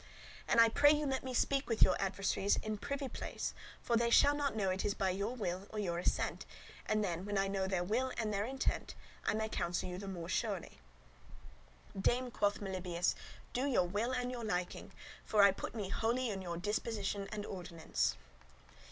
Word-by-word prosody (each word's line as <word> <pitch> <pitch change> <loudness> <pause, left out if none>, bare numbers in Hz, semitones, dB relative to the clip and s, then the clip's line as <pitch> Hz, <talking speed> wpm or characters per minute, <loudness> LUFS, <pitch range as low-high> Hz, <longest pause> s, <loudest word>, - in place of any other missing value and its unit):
And 235 - +4
I 230 - +9
pray 285 +6 +5
you 300 0 +2
let 265 -2 -1
me 260 - -4
speak 275 +2 +1
with 225 - +5
your - - +5
adversaries 195 +1 +1
in 215 -1 -3
privy 280 +2 -3
place, - - -4 0.3
for 235 - +1
they 235 0 +3
shall 285 +4 +6
not 285 -4 -1
know 195 -3 +1
it 185 +1 -1
is 205 - 0
by 190 -1 +1
your 200 +6 -2
will 190 -4 -3
or 215 - -7
your 175 -5 -1
assent; - - 0 0.4
and 215 0 +2
then, 175 -2 -2
when 205 0 -2
I 195 0 +2
know 195 -1 -1
their 190 -2 0
will 245 +8 0
and 215 -2 -1
their 200 0 +1
intent, 265 +2 -2 0.3
I - - +3
may 220 0 0
counsel 175 -5 -1
you 180 0 -5
the 200 - -7
more 175 -3 -5
surely." 175 - -2 1.2
'"Dame," 245 +6 +1
quoth 205 -2 +1
Melibœus, 180 -3 -1 0.4
'"do 260 +3 0
your 235 -10 +3
will 205 +7 -1
and 250 -1 -1
your 240 -2 -5
liking, 180 -5 -2 0.3
for 210 -2 +4
I 200 - +8
put 195 - -6
me 205 -4 -3
wholly 235 +3 0
in 195 -2 -4
your 170 -2 -4
disposition 205 0 -2
and 210 -1 -4
ordinance." 175 - -2
205 Hz, 195 wpm, -35 LUFS, 190-235 Hz, 1.2 s, I